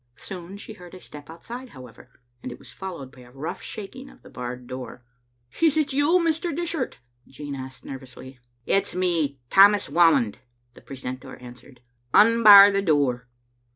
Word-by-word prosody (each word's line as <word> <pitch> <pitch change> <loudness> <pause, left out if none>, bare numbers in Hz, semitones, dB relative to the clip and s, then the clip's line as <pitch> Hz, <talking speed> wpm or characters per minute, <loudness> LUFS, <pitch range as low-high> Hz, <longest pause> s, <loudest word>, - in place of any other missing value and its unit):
Soon 185 +3 -9
she 220 - -10
heard 180 -3 -14
a - - -11
step 145 -4 -13
outside, 240 +10 -9
however, 125 -2 -14 0.3
and 125 - -7
it 120 - -9
was - - -15
followed 170 -9 -8
by 125 - -18
a 120 0 -16
rongh 135 +5 -7
shaking 245 +6 -9
of - - -20
the - - -15
barred 125 0 -7
door. 125 -1 -9 0.6
"Is 315 -2 +3
it 295 -3 0
yon, 325 +6 +2
Mr. 325 0 -1
Dishart?" 330 -5 -3 0.3
Jean 145 +1 -8
asked 130 -2 -9
nervously. 130 -1 -11 0.3
"It's 195 -1 0
me, 170 -6 -1
Tammas 200 -2 +5
Whamond," 160 -9 +3 0.3
the - - -17
precentor 130 0 -8
an 125 -1 -11
swered. 125 +1 -19 0.3
" 120 - -42
Unbar 210 -3 +8
the 200 0 0
door. 140 -8 0
165 Hz, 170 wpm, -24 LUFS, 130-210 Hz, 0.6 s, Unbar